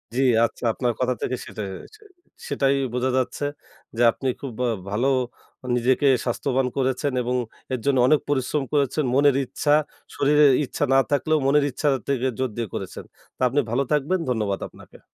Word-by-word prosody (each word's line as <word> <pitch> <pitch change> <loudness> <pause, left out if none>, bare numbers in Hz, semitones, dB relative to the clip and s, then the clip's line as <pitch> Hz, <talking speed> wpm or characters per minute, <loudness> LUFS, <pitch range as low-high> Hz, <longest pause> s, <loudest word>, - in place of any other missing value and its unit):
জ্বি 130 - +1 0.2
আচ্ছা। - - -7
আপনার 120 0 -1
কথা 125 0 +1
থেকে 130 - -1
সেটাই 105 -2 -6 0.3
চে 435 - -22 0.5
সেটাই 135 0 +2 0.2
বোঝা 125 +1 0
যাচ্ছে। 130 +2 -1 0.5
যে - - 0
আপনি 135 - -5
খুব 135 -4 -6
আ - - +1 0.2
ভালো 110 +6 0 0.7
নিজেকে 130 +4 +2 0.2
স্বাস্থ্যবান 130 +1 0
করেছেন 130 +1 0
এবং 125 +1 -1 0.4
এর 130 - -1
জন্য 140 -2 +2
অনেক 155 +2 +5
পরিশ্রম 140 +1 0
করেছেন। 145 +1 +1
মনের 140 0 +4
ইচ্ছা, 145 +3 0 0.4
শরীরের 145 0 +5
ইচ্ছা 135 - -3
না 135 - +6
থাকলেও 155 +2 +2
মনের 145 +1 +4
ইচ্ছা 145 +4 -2 0.2
থেকে 130 -2 0
জোর 130 -1 0
দিয়ে 115 -1 -2
করেছেন। - - -6 0.3
তো - - -15
আপনি 135 +4 +1
ভালো 130 +4 +1
থাকবেন 150 +5 +1
ধন্যবাদ 105 -5 -1
আপনাকে। - - -17
135 Hz, 165 wpm, -23 LUFS, 125-145 Hz, 0.7 s, না